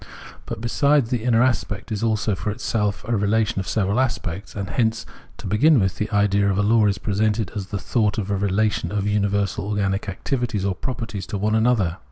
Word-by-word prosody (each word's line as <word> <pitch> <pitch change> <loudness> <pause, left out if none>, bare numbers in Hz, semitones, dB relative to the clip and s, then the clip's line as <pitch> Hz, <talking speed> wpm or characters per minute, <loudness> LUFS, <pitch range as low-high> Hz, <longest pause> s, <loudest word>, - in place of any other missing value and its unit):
But - - -5
besides, 140 +2 +2
the 120 -3 -1
inner 120 -1 +3
aspect 120 -5 -1
is 105 - -2
also 110 -2 +1
for 95 +3 -3
itself 105 -1 -2
a 120 - +1
relation 105 0 +1
of 95 - -4
several 100 +2 0
aspects; 100 -7 -2
and 100 -1 -3
hence, 110 -1 0 0.3
to - - -10
begin 145 +7 +4
with, 95 -2 0
the 105 - -2
idea 100 -1 +2
of 95 - 0
a 105 - +2
law 110 0 +4
is 100 - 0
presented 105 -1 0
as 100 -2 -4
the 100 - -4
thought 105 0 0
of 105 -2 -2
a - - +2
relation 100 -2 0
of 100 -1 -1
universal 100 -2 0
organic 100 -1 -1
activities 110 0 -2
or 100 - +1
properties 110 -2 -5
to 100 - -3
one 105 +2 0
another. 110 -6 +2
105 Hz, 205 wpm, -22 LUFS, 100-115 Hz, 0.3 s, begin